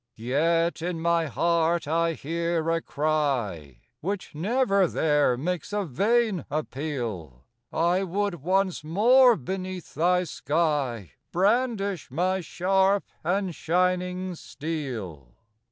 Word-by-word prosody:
Yet 165 +9 +1
in 175 0 -2
my 170 0 +1
heart 170 +2 +1
I 165 +2 +1
hear 165 +1 -1
a 165 0 +1
cry, 125 - -1 0.2
Which 195 +1 -4
never 200 - +2
there 150 -6 +2
makes 175 +6 -3
a 205 -1 0
vain 205 - +1
appeal 120 - -4 0.3
I 175 +3 +2
would 195 -2 -2
once 185 +1 +1
more 240 +10 +5
beneath 185 +4 -5
thy 180 +3 +2
sky 145 - -1 0.2
Brandish 200 - +1
my 185 +7 0
sharp 190 +4 +2 0.2
and 185 +2 0
shining 180 +2 0
steel. 125 - -6
170 Hz, 105 wpm, -26 LUFS, 150-185 Hz, 0.3 s, more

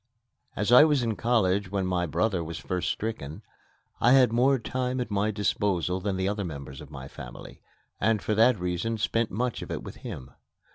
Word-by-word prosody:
As 105 +3 0
I 125 +4 +10
was 150 -5 +3
in 115 -2 -1
college 100 -5 +1
when 95 -1 -1
my 90 -1 0
brother 95 +2 0
was 80 +1 -6
first 90 -1 -2
stricken, 105 -5 -4 0.6
I 120 +3 +5
had 125 -4 +5
more 130 +3 +4
time 130 +1 -2
at 120 -3 -3
my 100 +1 +1
disposal 100 -3 0
than 95 0 -2
the 95 0 0
other 100 0 -1
members 70 -6 -7
of - - -11
the - - -8
family, - - -11 0.4
and 110 +1 +2
for 100 +4 -1
that 115 0 +4
reason 90 +6 -2
spent 115 +1 0
much 120 +3 -2
of - - -7
it - - -4
with - - -9
him. 65 0 -8
105 Hz, 195 wpm, -27 LUFS, 90-115 Hz, 0.6 s, I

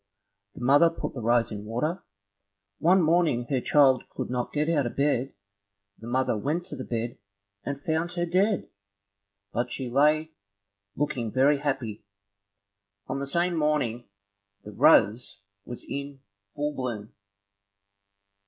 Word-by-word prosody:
The - - -10
mother 145 +6 +6
put 165 - -5
the 125 - -6
rose 115 0 +2
in 105 -1 -6
water. 150 - -2 0.8
One 180 +3 +4
morning 160 -7 +2
her 130 -2 +1
child 135 -3 +4
could - - -5
not 125 -1 -2
get 150 +1 0
out 150 -6 +2
of - - -7
bed, 140 -2 0 0.6
the 115 - -10
mother 130 0 +1
went 150 +10 -2
to - - -5
the 130 - -6
bed 120 0 -4 0.4
and 140 +3 -5
found 165 +2 -1
her 175 -1 -1
dead, 190 +3 +1 0.8
but 120 +1 -1
she 130 -3 -4
lay 150 +4 +3 0.6
looking 125 -6 -2
very 140 +4 +3
happy. 130 -7 -3 1.0
On 135 +1 -3
the 140 - -3
same 175 +5 +1
morning, 150 -8 0 0.5
the 105 - -9
rose 100 0 +3 0.2
was 120 - -7
in 140 -1 -6 0.3
full 150 +1 -1
bloom. 120 -6 -5
140 Hz, 140 wpm, -27 LUFS, 120-155 Hz, 1.0 s, mother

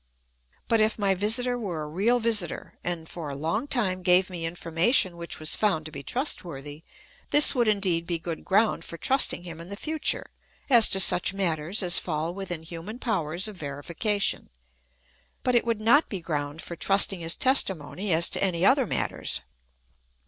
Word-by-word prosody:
But 225 -1 +2
if 215 0 +1
my 200 -2 +1
visitor 245 +6 +1
were 175 -8 -4
a - - -7
real 205 +10 +1
visitor, 220 -7 -1
and 170 -2 -4
for 160 -3 -7
a 140 - -6
long 165 - -3
time 190 -9 -1
gave 180 +1 +3
me 165 -2 -4
information 170 - +1
which 170 0 -5
was 155 -1 +1
found 190 -8 0
to 155 - -8
be 140 -2 -8
trustworthy, 150 - -4 0.5
this 295 0 +7
would 240 -4 +1
indeed 185 -5 +1
be 170 - -1
good 165 0 -7
ground 205 -3 +1
for 170 - -9
trusting 260 -5 +3
him 165 -2 -9
in 170 - -10
the 200 - -5
future 315 +4 -1 0.4
as 235 -3 +6
to 195 - +1
such 185 0 +3
matters 175 +1 -1
as 175 -1 +5
fall 160 0 -3
within 180 -4 -6
human 170 +7 -8
powers 185 -6 -2
of 210 -3 -10
verification; 170 +8 -2 0.9
but 250 - +1
it 240 - +2
would 230 -2 -1
not 235 +8 +3
be 195 - -4
ground 150 -2 -5
for 170 - -7
trusting 195 +1 +4
his 165 0 0
testimony 195 - +1
as 165 +1 +3
to - - -2
any 180 -2 0
other 265 0 +3
matters. - - -3
185 Hz, 180 wpm, -25 LUFS, 165-215 Hz, 0.9 s, this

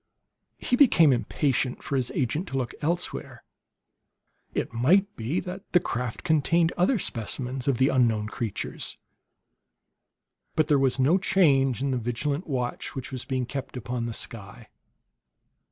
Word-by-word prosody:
He 250 - 0
became 170 - +6
impatient 130 +1 0
for 140 - -2
his 130 -2 +1
agent 145 +8 -1
to 135 - -3
look 125 -3 -2
elsewhere; 170 +4 -3 1.1
it - - -2
might 185 - +3
be 125 +11 -1
that 185 +1 -8
the 180 - +7
craft 125 -7 -4
contained 165 +1 +2
other 185 +8 +3
specimens 125 - -3
of 135 -4 +2
the 130 +3 +3
unknown 115 -5 +2
creatures. 110 -2 -4 1.6
But 155 -1 +2
there 145 -2 +4
was 135 -1 +2
no 145 +8 +4
change 135 - +3
in 140 - 0
the 130 - 0
vigilant 140 - -2
watch 125 -4 -3
which 135 0 -5
was 130 -2 -4
being 130 -2 -1
kept 135 +1 -6
upon 120 0 -3
the 115 - -4
sky. 110 +1 -8
135 Hz, 145 wpm, -26 LUFS, 120-160 Hz, 1.6 s, the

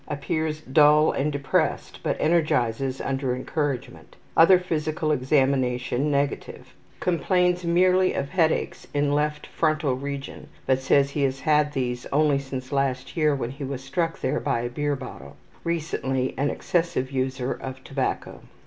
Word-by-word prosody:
Appears 155 +1 -2
dull 150 +2 +5
and 150 +2 -1
depressed, 140 -1 -1
but - - -1
energizes 135 -6 +1
under 135 -2 -1
encouragement. 140 0 -4 0.2
Other 180 +3 +7
physical 155 -3 -1
examination 130 -1 +1
negative. 140 0 -2 0.3
Complains 180 0 +1
merely 185 +2 +3
of 140 - -2
headaches 165 -2 0
in 145 0 +2
left 150 +1 0
frontal 155 -4 0
region, 140 +1 -6 0.2
but 130 -1 +2
says 140 +1 +3
he 145 - -2
has 135 -1 0
had 150 -1 +2
these 125 -3 -2
only 145 -1 +3
since 130 -1 -6
last 135 -2 -1
year 155 -3 +3
when 125 -3 -3
he 140 +2 -8
was 135 -1 -5
struck 165 +4 -2
there 130 - 0
by 115 - -1
a 120 - -3
beer 145 +3 -1
bottle. 130 -1 -9 0.3
Recently 135 -6 -1
an 140 +2 0
excessive 165 -7 -1
user 130 -1 -1
of 130 0 -8
tobacco. 135 -1 -3
140 Hz, 145 wpm, -25 LUFS, 130-155 Hz, 0.3 s, Other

